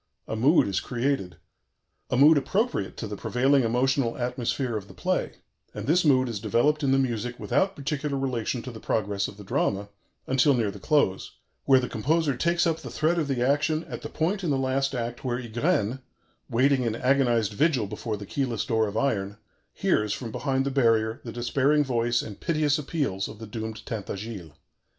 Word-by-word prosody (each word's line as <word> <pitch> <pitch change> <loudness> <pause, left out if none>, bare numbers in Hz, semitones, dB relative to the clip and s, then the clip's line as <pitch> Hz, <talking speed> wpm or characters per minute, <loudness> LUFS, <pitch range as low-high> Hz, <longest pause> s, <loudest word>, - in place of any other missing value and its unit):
A - - -3
mood 140 +9 +4
is 95 -2 0
created 120 - -2 0.7
a 125 - 0
mood 150 +4 +7
appropriate 200 - -1
to 110 - -4
the 105 - -5
prevailing 130 +6 +2
emotional 125 +1 +1
atmosphere 125 0 -2
of 100 -2 -4
the - - -14
play; - - -1 0.4
and - - -5
this 170 +5 +3
mood 130 -4 +4
is 115 -4 -4
developed 120 +9 +2
in 140 -2 +2
the 135 - +4
music 120 -2 -1
without 190 +10 +1
particular 140 0 -2
relation 125 -2 -2
to 125 - -6
the 110 - -9
progress 100 -2 -1
of 100 - -11
the 105 - -10
drama 100 +1 -1 0.4
until 135 +1 +3
near 110 -4 0
the 100 - -10
close, 140 -8 +1 0.3
where 135 -1 +6
the 125 - -2
composer 150 +5 0
takes 170 +6 +1
up 165 -1 0
the - - -8
thread 165 +3 +1
of 155 - -1
the 130 -2 0
action 155 +3 +1
at - - -7
the - - -6
point 185 +5 -1
in 170 - 0
the 140 - +2
last 135 +1 0
act 120 0 -4
were 125 -2 -1
Ygraine, 120 - 0 0.5
waiting 130 +3 +3
in 115 -3 -1
agonized 120 -4 +2
vigil 135 -1 +2
before 105 +2 -4
the 100 - -8
keyless 125 0 -2
door 110 -2 +1
of 105 +1 -4
iron, 105 -6 -1 0.3
hears, 105 -1 +1
from 115 -1 -5
behind 135 +2 -1
the 140 - -1
barrier, 115 -4 +2
the 115 - -6
despairing 135 +5 +2
voice 120 -2 0
and 105 -3 -9
piteous 155 -3 +1
appeals 140 - -2
of - - -10
the 110 - -8
doomed 110 0 -6
Tintagiles. 100 -5 -6
125 Hz, 190 wpm, -26 LUFS, 110-140 Hz, 0.7 s, mood